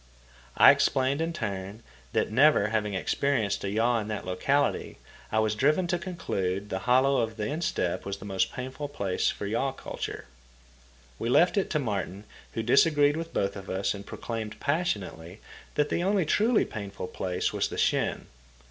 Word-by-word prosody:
I - - +10
explained, 135 +3 +1
in 165 +1 -1
turn, 100 - -5 0.3
that, - - 0
never 130 -3 +5
having 105 -2 -1
experienced 110 0 0
a 100 - -1
yaw 115 +3 +2
in 105 - -4
that 105 -1 -4
locality, 135 +11 0 0.3
I 110 - 0
was 110 -1 +2
driven 150 - +2
to 175 0 -1
conclude 100 - -3
the 95 - -1
hollow 135 +2 +4
of 110 -1 -1
the 105 - -2
instep 145 - -1
was 100 0 -4
the 100 - -10
most 95 -2 0
painful 130 +3 -5
place 100 -10 0
for - - -4
yaw 115 +6 -1
culture. - - -6 0.9
We 115 - -2
left 175 - +4
it 200 - +1
to 155 - 0
Martin, 100 - -3 0.3
who 115 - -2
disagreed 145 +4 +4
with 165 +1 -5
both 100 0 -1
of 95 -1 -8
us 95 +1 0
and 100 -1 -8
proclaimed 110 +1 -6
passionately 105 - -2 0.4
that 150 0 +2
the - - 0
only 190 -1 +2
truly 220 +9 +3
painful 100 -3 -6
place 90 -1 -2
was - - 0
the - - -7
shin. - - +1
115 Hz, 175 wpm, -28 LUFS, 100-145 Hz, 0.9 s, I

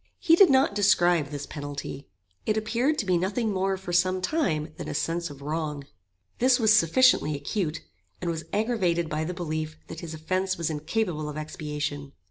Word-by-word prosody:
He 330 - +5
did 385 +1 +7
not 265 -5 +4
describe 175 -6 +3
this 145 0 -6
penalty. 145 -1 -7 0.4
It 215 - +2
appeared 240 +8 0
to - - -1
be 180 -2 +2
nothing 205 +4 -1
more 190 0 0
for 185 -2 -6
some 185 +2 +3
time 175 - -1
than - - -6
a - - -4
sense 170 0 -1
of 140 -1 -11
wrong. 150 -1 -3 0.6
This 255 +1 +4
was 220 -2 +5
sufficiently 165 - +4
acute, 155 +3 -3 0.4
and 170 - -2
was 160 -1 -5
aggravated 190 -7 0
by 155 +1 -2
the 180 +2 -4
belief 155 -2 -4
that 165 - -7
his 165 -2 -7
offence 185 +4 -1
was 165 -1 -1
incapable 155 0 -2
of 150 - -6
expiation. 150 -2 -4
170 Hz, 180 wpm, -26 LUFS, 155-205 Hz, 0.6 s, did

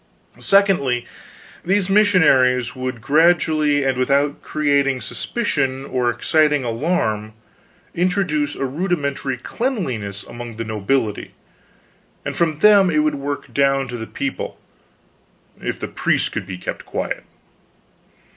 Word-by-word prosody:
Secondly, 175 -12 +2 0.6
these 190 +1 +1
missionaries 160 - +4
would 130 -2 -4
gradually, 155 0 +3
and 135 -1 0
without 140 +2 +1
creating 140 -3 +1
suspicion 135 - -2
or 125 -2 0
exciting 150 +3 +2
alarm, 115 -4 -1 0.6
introduce 170 -5 0
a 135 - -2
rudimentary 140 -3 -2
cleanliness 130 - -3
among 120 -1 -8
the 115 +1 -4
nobility, 110 +1 -2 0.9
and - - -3
from 160 -3 +1
them 200 +1 +6
it 155 -2 +2
would 155 - +1
work 140 0 -5
down 135 -1 +2
to 125 - -5
the 110 -1 -6
people, 140 - -4 1.0
if - - -3
the - - -4
priests - - 0
could - - -5
be 95 -2 -6
kept - - -6
quiet. - - -4
140 Hz, 120 wpm, -20 LUFS, 125-165 Hz, 1.0 s, them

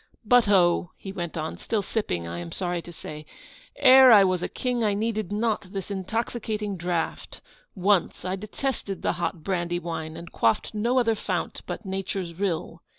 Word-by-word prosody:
'But 240 -1 +5
oh!' 175 -3 +4
he 195 - -7
went 175 -3 -5
on 155 0 -4
(still 215 -3 -1
sipping, 90 - -2
I 85 +1 -5
am 85 -1 -7
sorry 175 -1 -2
to 175 - -11
say), 155 -2 -8 0.5
'ere 265 -2 +8
I 205 -3 +9
was 185 -2 +1
a - - -2
king, 250 -2 -1
I 205 -2 +2
needed 215 -2 -2
not 210 -2 -1
this 195 0 -5
intoxicating 210 +1 -2
draught; 170 -2 -3 0.4
once 190 -2 +1
I 185 +1 -1
detested 210 0 -4
the - - +2
hot 175 -3 -2
brandy 175 -2 -1
wine, 160 -2 -5
and 170 0 -9
quaffed 115 - +1
no 235 +4 +1
other 235 -3 +3
fount 215 - -3
but 225 - -5
nature's 190 -2 -3
rill. 170 -2 -3
195 Hz, 175 wpm, -26 LUFS, 175-215 Hz, 0.5 s, I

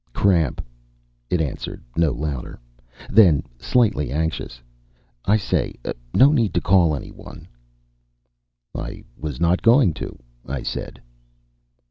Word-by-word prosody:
"Cramp," 85 -12 +1 0.6
it 90 - +1
answered, 75 -4 -5
no 80 -2 +3
louder. 70 -3 -5 0.5
Then 95 -9 +6 0.2
slightly 105 - +1
anxious, 80 -4 -3 0.7
"I 105 +2 +4
say, 95 - -1 0.4
no 135 - +6
need 115 -9 +1
to - - +4
call 85 -4 +3
anyone." 70 - -10 1.3
"I - - -6
was 75 -3 -6
not 85 +2 +2
going 115 - +5
to," - - -6 0.3
I 65 0 -4
said. - - -5
85 Hz, 110 wpm, -22 LUFS, 75-100 Hz, 1.3 s, Then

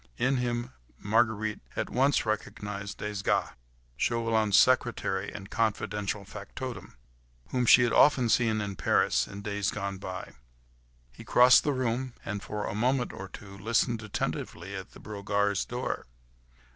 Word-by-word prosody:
In 130 +1 +2
him 120 -1 -2 0.3
Marguerite 110 0 +1 0.2
at - - -2
once 135 +1 +2
recognised 105 -1 -4
Desgas, 105 -1 -1 0.4
Chauvelin's 110 - +2
secretary 120 -6 +2
and 100 -2 -9
confidential 105 -2 -1
factotum, 105 - -7 0.6
whom 125 -1 0
she 125 - +8
had 120 - +1
often 130 -5 +5
seen 110 -2 +2
in 100 -1 -4
Paris, - - +2
in 100 +1 -9
the 105 - -4
days 100 -1 0
gone 100 -2 -4
by. 95 -1 -7 0.8
He - - -12
crossed 125 +1 +6
the 145 - +1
room, 130 -1 -1
and 100 0 -3
for 105 0 -4
a - - -3
moment 125 +4 0
or 95 - -7
two 100 +1 -11
listened 115 +3 0
attentively 100 -3 -4
at 95 -1 -8
the - - -13
Brogards' 100 -1 -1
door. 120 - -4
105 Hz, 145 wpm, -29 LUFS, 100-120 Hz, 0.8 s, she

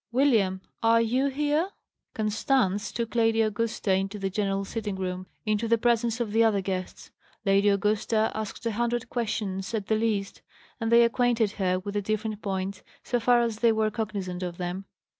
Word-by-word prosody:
William, 225 -8 +2 0.2
are 230 0 +5
you 250 +4 +2
here?" 295 +5 0 0.5
Constance 215 -1 +1
took 235 -1 -3
Lady 225 -1 +3
Augusta 215 -2 0
into 195 +2 -1
the 195 -1 -2
general 195 0 -1
sitting 210 -1 -4
room, 185 -1 -4 0.2
into 215 +1 0
the 230 +1 +4
presence 235 0 +1
of 230 -3 -2
the 225 +2 +4
other 215 -3 +3
guests. 185 -1 -5 0.3
Lady 200 +1 +4
Augusta 215 +2 +1
asked 220 +2 -5
a 230 - +1
hundred 240 +2 -1
questions, 205 -4 -2
at 210 -3 -2
the 220 - +1
least; 215 -3 -1 0.4
and 225 -1 -1
they 235 0 +7
acquainted 235 -2 +2
her 185 -3 0
with 200 +2 -5
the 205 - 0
different 215 +1 -2
points, 190 -1 -3 0.2
so 245 - 0
far 240 +1 +4
as 230 -2 -2
they 235 -1 +5
were 220 -1 +1
cognizant 200 -5 -4
of 175 -1 -4
them. 180 +2 -4
215 Hz, 180 wpm, -27 LUFS, 195-230 Hz, 0.5 s, they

